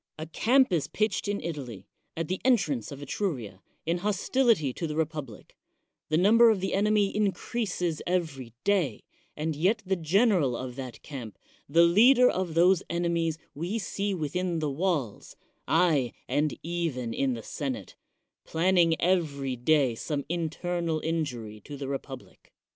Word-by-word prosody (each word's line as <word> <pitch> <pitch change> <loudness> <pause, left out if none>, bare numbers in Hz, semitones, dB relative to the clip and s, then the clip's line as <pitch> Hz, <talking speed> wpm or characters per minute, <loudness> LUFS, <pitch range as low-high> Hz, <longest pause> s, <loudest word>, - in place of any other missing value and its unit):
A 155 - -5
camp 245 - +3
is 160 -5 +1
pitched 215 -1 -1
in 205 0 -1
Italy, 130 - -6 0.3
at 165 -1 -2
the 185 +1 -3
entrance 155 - +1
of 140 0 -8
Etruria, 130 - -3 0.2
in 170 +2 0
hostility 210 - +1
to 165 - -3
the 150 - -4
republic; 150 -8 -4 0.5
the 155 - +2
number 225 +6 +6
of 215 -3 +2
the 190 0 -2
enemy 205 0 +2
increases 195 -4 -1
every 155 -9 -2
day; 180 - +1 0.3
and 155 +1 -2
yet 195 +8 +1
the 190 +1 +1
general 175 - +2
of 125 -1 -6
that 130 -3 -8
camp, 125 -8 -8 0.3
the 165 +4 +5
leader 240 +9 +6
of 180 -7 -1
those 180 +2 +5
enemies, 170 -2 0 0.2
we 175 +9 -3
see 200 -1 -2
within 175 +2 -2
the 155 -2 -1
walls 150 - -2 0.2
— - - -46
aye, 145 -9 +2
and 150 0 0
even 160 -9 -2
in 135 0 0
the 115 - -8
senate - - -5 0.3
— - - -58
planning 170 -1 +2
every 145 -7 0
day 135 0 +2
some 140 +4 -3
internal 170 0 -2
injury 125 -10 -3
to 145 +7 -9
the 135 -1 -5
republic. 135 -1 -7
165 Hz, 155 wpm, -28 LUFS, 140-190 Hz, 0.5 s, number